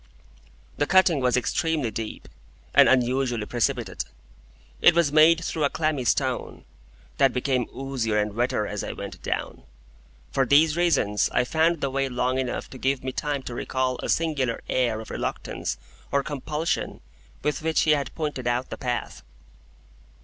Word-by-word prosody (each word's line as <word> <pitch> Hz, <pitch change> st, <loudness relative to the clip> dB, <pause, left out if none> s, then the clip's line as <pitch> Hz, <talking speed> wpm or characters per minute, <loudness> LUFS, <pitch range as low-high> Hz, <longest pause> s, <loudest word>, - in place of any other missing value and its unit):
The 145 Hz, -, +1 dB
cutting 185 Hz, -5 st, +4 dB
was 125 Hz, -1 st, +2 dB
extremely 150 Hz, -1 st, 0 dB
deep, 110 Hz, -1 st, -6 dB, 0.5 s
and -, -, +7 dB
unusually 125 Hz, -3 st, +1 dB
precipitate. 120 Hz, -, -1 dB, 0.8 s
It -, -, +7 dB
was 170 Hz, -4 st, +3 dB
made 160 Hz, +2 st, +6 dB
through 160 Hz, -, -2 dB
a 140 Hz, -, +3 dB
clammy 155 Hz, -5 st, -1 dB
stone, 95 Hz, -, -1 dB, 0.5 s
that 135 Hz, -, +5 dB
became 125 Hz, -1 st, 0 dB
oozier 130 Hz, -5 st, -1 dB
and 105 Hz, -1 st, 0 dB
wetter 115 Hz, -2 st, 0 dB
as 105 Hz, 0 st, -4 dB
I -, -, -4 dB
went -, -, -8 dB
down. -, -, -3 dB, 0.7 s
For 135 Hz, -, +2 dB
these 150 Hz, +4 st, +4 dB
reasons, 165 Hz, -12 st, +2 dB
I -, -, +2 dB
found 160 Hz, +5 st, +1 dB
the 140 Hz, -, -1 dB
way 135 Hz, 0 st, 0 dB
long 125 Hz, +1 st, 0 dB
enough 130 Hz, -2 st, -3 dB
to 130 Hz, -, -9 dB
give 135 Hz, 0 st, 0 dB
me 130 Hz, -, -2 dB
time 145 Hz, 0 st, -2 dB
to 125 Hz, -, -6 dB
recall 130 Hz, +1 st, -1 dB
a -, -, -4 dB
singular 145 Hz, -8 st, 0 dB
air 120 Hz, -4 st, 0 dB
of 110 Hz, -, -10 dB
reluctance -, -, -3 dB, 0.3 s
or 140 Hz, 0 st, +2 dB
compulsion 150 Hz, +3 st, -3 dB, 0.4 s
with 150 Hz, -2 st, -1 dB
which 160 Hz, 0 st, +1 dB
he 155 Hz, -, +3 dB
had 140 Hz, -4 st, 0 dB
pointed 150 Hz, -6 st, -3 dB
out 120 Hz, +2 st, -1 dB
the -, -, -6 dB
path. 125 Hz, -1 st, -3 dB
130 Hz, 160 wpm, -25 LUFS, 125-150 Hz, 0.8 s, and